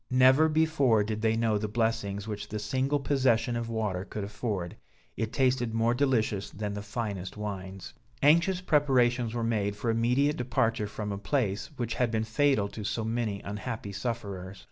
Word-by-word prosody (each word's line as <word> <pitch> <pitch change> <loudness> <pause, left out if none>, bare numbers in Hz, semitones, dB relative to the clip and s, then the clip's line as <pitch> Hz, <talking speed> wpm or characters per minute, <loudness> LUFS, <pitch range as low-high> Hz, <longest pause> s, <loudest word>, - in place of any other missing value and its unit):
Never 130 +5 +5
before 145 -8 +3
did 110 +1 -3
they 110 0 +2
know 110 -2 +2
the 105 - -2
blessings 105 -2 -1
which 105 -1 -5
the 105 - -3
single 130 +7 0
possession 130 -4 +2
of 115 0 -3
water 105 -5 -1
could 105 +1 -5
afford; 100 -3 -3 0.4
it 110 -1 -2
tasted 125 -3 +1
more 115 +1 +3
delicious 120 -7 +1
than 105 0 -4
the 100 - -4
finest 100 -3 -4
wines. 95 -2 -6 0.3
Anxious 170 +5 +4
preparations 125 -7 +2
were 120 - -1
made 105 -3 0
for 115 +3 -1
immediate 125 +6 +2
departure 115 -3 0
from 105 0 -5
a 100 - -4
place, 105 -4 -1
which 120 -2 -2
had 125 -2 +1
been 110 -1 0
fatal 115 -1 +2
to 105 - -7
so 110 +2 -2
many 110 -3 -2
unhappy 105 +1 -5
sufferers. 100 -4 -5
115 Hz, 170 wpm, -29 LUFS, 105-125 Hz, 0.4 s, Never